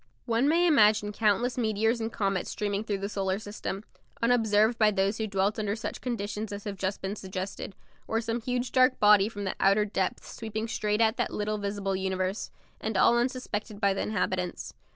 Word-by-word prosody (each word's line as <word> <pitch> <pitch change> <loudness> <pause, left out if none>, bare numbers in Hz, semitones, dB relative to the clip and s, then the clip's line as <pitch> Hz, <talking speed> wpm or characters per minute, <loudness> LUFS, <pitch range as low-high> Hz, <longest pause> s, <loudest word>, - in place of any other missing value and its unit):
One 235 +3 +2
may 340 +3 +4
imagine 215 -9 +4
countless 225 +4 +1
meteors 225 +1 +1
and 225 +1 -2
comets 195 -4 -1
streaming 205 -1 -2
through 210 -2 -2
the 195 +1 -3
solar 195 -2 -1
system, 205 -1 -5 0.4
unobserved 225 -1 +3
by 215 -1 +6
those 200 +1 0
who 220 - -1
dwelt 200 +1 0
under 210 -1 -1
such 220 - -5
conditions 215 -3 -3
as 205 0 -6
have 205 -2 -4
just 190 +1 -2
been 195 +2 -2
suggested, 190 0 -6 0.3
or 225 - 0
some 230 +1 -2
huge 250 +1 -2
dark 255 0 +4
body 210 -1 +6
from 205 -2 -6
the 190 - -2
outer 200 +2 +4
depths 195 -2 -3
sweeping 220 0 -4
straight 210 -1 0
at 225 +1 +3
that 240 - -1
little 210 0 -2
visible 200 -1 -2
universe, 190 +1 -2 0.3
and 220 -2 -2
all 235 - +5
unsuspected 240 -4 -2
by 200 -2 +3
the 195 - -2
inhabitants. 185 -3 -2
210 Hz, 190 wpm, -28 LUFS, 200-225 Hz, 0.4 s, by